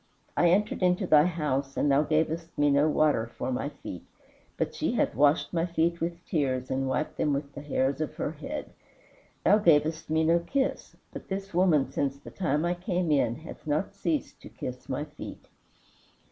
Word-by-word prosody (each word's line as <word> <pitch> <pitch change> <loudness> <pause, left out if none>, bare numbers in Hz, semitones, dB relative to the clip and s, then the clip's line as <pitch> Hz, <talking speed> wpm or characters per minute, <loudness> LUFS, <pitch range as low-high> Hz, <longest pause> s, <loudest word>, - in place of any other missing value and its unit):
I 175 - +4
entered 205 +4 +1
into 180 +1 +2
thy 155 -2 +6
house 140 -5 -2
and 145 - +2
thou 140 +1 +5
gavest 160 +2 -1
me 145 0 +4
no 145 +2 +4
water 150 -7 +2
for - - -2
my 130 +3 -2
feet, 90 - -9 0.5
but - - -1
she - - -1
hath - - +1
washed 145 +8 +3
my 170 0 +1
feet 170 0 0
with 170 +1 -3
tears 130 -6 -1
and 135 0 0
wiped 150 +3 -2
them 150 - +1
with 140 0 -3
the 140 - -7
hairs 140 0 0
of 155 - -3
her - - -2
head. 275 - -6 0.7
Thou 210 - +6
gavest 160 -4 +3
me 160 +1 +2
no 165 +2 +4
kiss, 265 +10 -2 0.2
but - - -8
this 195 0 -5
woman, 170 -6 +3
since 140 -1 -1
the - - -12
time 155 -4 0
I 175 - +1
came 180 -2 -1
in, 125 -5 +2
hath 165 - -11
not 155 +7 0
ceased 295 +9 -2
to - - -11
kiss - - -7
my - - -1
feet. - - -10
155 Hz, 190 wpm, -28 LUFS, 140-175 Hz, 0.7 s, thy